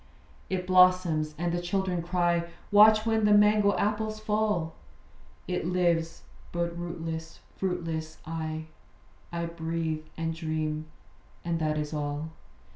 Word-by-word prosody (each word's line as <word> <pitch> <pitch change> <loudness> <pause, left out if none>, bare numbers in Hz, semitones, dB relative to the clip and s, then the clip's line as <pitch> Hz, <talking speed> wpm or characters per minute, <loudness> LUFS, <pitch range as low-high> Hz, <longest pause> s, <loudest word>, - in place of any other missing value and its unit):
It 185 -1 -2
blossoms; 180 -4 +4
and 175 +1 -1
the 175 - -1
children 180 0 -1
cry 175 0 +1 0.3
'Watch 215 +1 +7
when 225 -1 +2
the 210 - +5
mango 210 0 +4
apples 215 +1 -1
fall.' 210 -6 0 0.7
It 180 -2 -2
lives: 170 -2 0 0.3
but 170 0 -2
rootless, 165 -1 -5 0.2
fruitless, 165 -4 -3
I 160 -1 -4 0.7
I 170 0 -2
breathe 165 -1 -3
and 165 0 -1
dream; 155 -1 -3 0.6
and 170 -1 0
that 155 -1 0
is 150 0 -3
all. 150 +1 -3
170 Hz, 120 wpm, -28 LUFS, 160-185 Hz, 0.7 s, Watch